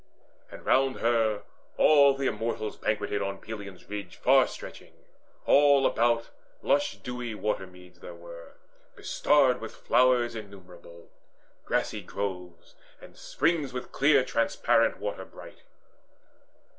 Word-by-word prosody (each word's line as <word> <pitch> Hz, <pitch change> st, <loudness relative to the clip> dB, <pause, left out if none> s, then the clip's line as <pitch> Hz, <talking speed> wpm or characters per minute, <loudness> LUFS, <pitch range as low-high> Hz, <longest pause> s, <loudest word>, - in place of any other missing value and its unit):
And -, -, -12 dB
round 135 Hz, 0 st, +2 dB
her 115 Hz, -3 st, +1 dB, 0.3 s
all 140 Hz, -3 st, +5 dB
the 135 Hz, 0 st, -3 dB
Immortals 115 Hz, -2 st, -3 dB
banqueted 105 Hz, -1 st, -2 dB
On 100 Hz, 0 st, -3 dB
Pelion's 100 Hz, -3 st, -10 dB
ridge 100 Hz, -3 st, -7 dB
far -, -, +4 dB
stretching. -, -, -11 dB, 0.5 s
All 140 Hz, -1 st, +5 dB
about 115 Hz, 0 st, +1 dB, 0.3 s
Lush 285 Hz, +1 st, +1 dB
dewy 125 Hz, -2 st, -6 dB
watermeads 90 Hz, -4 st, -5 dB
there 85 Hz, -, -10 dB
were, 85 Hz, -1 st, -12 dB, 0.4 s
bestarred 135 Hz, -4 st, +2 dB
With 110 Hz, -, -8 dB
flowers 125 Hz, -2 st, +2 dB
innumerable, 90 Hz, -5 st, -12 dB, 0.5 s
grassy -, -, -1 dB
groves, 90 Hz, -4 st, -6 dB, 0.3 s
And -, -, -15 dB
springs 150 Hz, -6 st, -1 dB
with 125 Hz, -, -6 dB
clear 140 Hz, -1 st, +3 dB
transparent 115 Hz, -2 st, +1 dB
water -, -, -5 dB
bright. -, -, -14 dB
110 Hz, 115 wpm, -27 LUFS, 100-130 Hz, 0.5 s, all